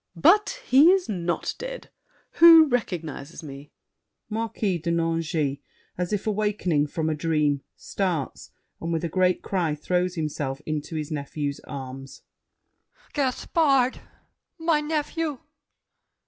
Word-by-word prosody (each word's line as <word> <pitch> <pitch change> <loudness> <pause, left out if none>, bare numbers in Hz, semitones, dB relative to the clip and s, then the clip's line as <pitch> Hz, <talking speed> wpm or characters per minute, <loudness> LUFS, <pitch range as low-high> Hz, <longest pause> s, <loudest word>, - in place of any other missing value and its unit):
But 420 - +3
he 280 +6 +6
is 380 0 +3
not 175 -5 -2
dead! - - -7 0.5
Who 330 -1 +10
recognizes 170 - -3
me? 140 -1 -10 0.6
MARQUIS 215 -5 -1
DE 170 - -3
NANGIS 165 -4 0 0.4
(as 180 -1 -3
if 205 -2 -1
awakening 205 -8 0
from 160 +1 -2
a 160 - +1
dream, 150 -2 0
starts, 175 -8 -3 0.3
and 165 - -3
with 165 0 -1
a 170 - -1
great 185 +2 +1
cry 170 -6 -1
throws 180 +4 -1
himself 145 -4 -3
into 155 +1 -4
his 155 -1 -4
nephew's 145 -1 -3
arms). 135 -1 -8 0.9
Gaspard! 275 -1 +1 0.6
My 325 -2 +2
nephew! 305 0 -2
175 Hz, 120 wpm, -25 LUFS, 150-255 Hz, 0.9 s, Who